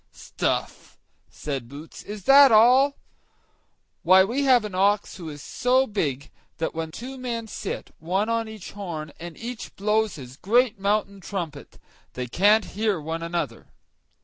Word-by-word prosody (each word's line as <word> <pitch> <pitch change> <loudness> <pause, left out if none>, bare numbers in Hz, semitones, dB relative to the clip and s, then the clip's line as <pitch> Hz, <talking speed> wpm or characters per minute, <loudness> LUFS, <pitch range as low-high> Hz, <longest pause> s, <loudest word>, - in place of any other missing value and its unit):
"Stuff!" - - -4 0.3
said 135 -5 -5
Boots; 145 +4 -10
"is 205 -2 -8
that 275 +3 +8
all? 255 +6 +5 1.0
Why, 185 +2 +6
we 250 +8 -1
have 250 -4 +5
an 210 - -6
ox 200 +2 +1
who 170 -4 -7
is 145 -2 -9
so 260 +1 +2
big, 145 - -3 0.3
that 160 - -2
when 160 0 -4
two 255 +10 -8
men 235 -2 -3
sit, - - -6
one 190 +6 -1
on 230 0 -1
each 215 -4 -9
horn, 170 -7 -6
and 170 -1 -8
each 235 0 -7
blows 215 +1 0
his 130 -2 -10
great 230 +2 +2
mountain 200 0 0
trumpet, 170 -7 -6 0.4
they 125 - -4
can't 205 - +3
hear 210 -3 0
one 160 +2 -4
another." 170 +1 -4
200 Hz, 150 wpm, -24 LUFS, 165-230 Hz, 1.0 s, that